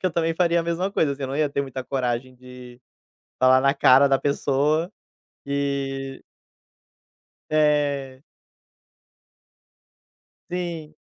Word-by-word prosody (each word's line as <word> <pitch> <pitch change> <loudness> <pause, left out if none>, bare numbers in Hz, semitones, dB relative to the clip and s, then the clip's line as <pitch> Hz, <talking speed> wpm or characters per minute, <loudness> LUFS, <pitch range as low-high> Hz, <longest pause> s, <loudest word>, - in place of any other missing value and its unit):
que 185 - 0
eu - - +1
também 165 0 0
faria 170 0 +2
a - - -3
mesma 170 +3 -2
coisa 155 -7 +1
assim, 140 - -8
eu 135 - -3
não 135 - -4
ia 150 -2 +1
ter 140 - -1
muita 130 -2 -5
coragem 130 -1 -3
de, 125 -1 -13 0.6
falar 130 0 +6
na 140 +1 +2
cara 140 +1 +5
da 135 -1 +3
pessoa, 145 +4 0 0.6
que 140 -1 -3 1.3
é. 145 -3 +1 2.3
Sim. 170 -4 -5
140 Hz, 125 wpm, -23 LUFS, 135-155 Hz, 2.3 s, falar